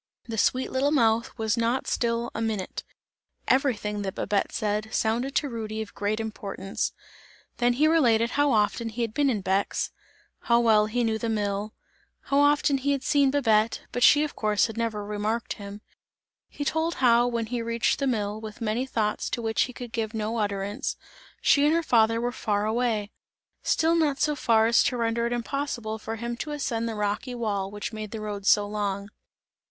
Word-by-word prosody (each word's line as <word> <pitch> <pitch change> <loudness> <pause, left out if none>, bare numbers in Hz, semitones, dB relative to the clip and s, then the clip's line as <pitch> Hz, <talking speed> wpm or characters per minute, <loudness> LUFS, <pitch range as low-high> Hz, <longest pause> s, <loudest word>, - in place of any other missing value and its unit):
The 230 - -4
sweet 255 +4 +1
little 265 +2 +2
mouth 230 -5 +2
was 220 -1 0
not 235 +2 0
still 235 0 -1
a 225 - -4
minute; 215 -4 -3 0.6
everything 215 -6 +1
that 190 -2 -4
Babette 205 -1 0
said, 215 0 -2
sounded 235 +6 0
to 295 - +2
Rudy 220 -3 -5
of 210 - -14
great 205 +2 -1
importance. 200 -3 -4 0.7
Then 245 -1 +3
he 295 +5 +3
related 240 -8 +3
how 290 0 +2
often 220 +1 +1
he 235 +2 -3
had 225 -2 -3
been 285 +1 +2
in 215 -6 0
Bex, 190 +1 0 0.5
how 235 0 +3
well 215 -3 +4
he 240 +3 0
knew 220 -1 0
the 230 - -2
mill; 205 -1 -2 0.5
how 280 - +1
often 290 -1 +3
he 285 +2 +1
had 275 -1 -3
seen 280 -2 +3
Babette, 225 -5 +2
but 245 - -3
she 290 +4 +7
of 300 - -4
course 210 -1 +2
had 225 - -5
never 225 -3 -2
remarked 210 +3 -2
him; 200 0 -9 0.7
he 290 - -5
told 320 +3 0
how, 240 -1 +4
when 235 -2 -1
he 235 +1 -3
reached 230 0 0
the 275 - 0
mill, 215 -3 -1
with 215 -1 -8
many 230 +3 -1
thoughts 215 -4 -1
to - - -2
which 225 -1 +1
he 250 - -8
could 245 -1 -8
give 225 -1 -3
no 220 +1 -2
utterance, 205 +4 -2 0.4
she 285 - +4
and 300 +2 +4
her 335 - +1
father 230 -4 +3
were 240 +1 -1
far 210 -4 -1
away; 220 -2 0 0.5
still 325 +1 +2
not 300 -5 +1
so 300 -1 +1
far 225 -5 +3
as 230 +1 +4
to 250 - 0
render 235 0 0
it - - -4
impossible 240 -3 -3
for 225 +1 -5
him 235 +1 -4
to 300 - -5
ascend 235 -6 -2
the 225 - -4
rocky 210 +4 -2
wall 205 -5 -2
which 205 +2 -6
made 215 -1 -5
the 220 - -6
road 205 -2 -5
so 205 0 +5
long. 200 -1 -2
230 Hz, 195 wpm, -26 LUFS, 210-250 Hz, 0.7 s, she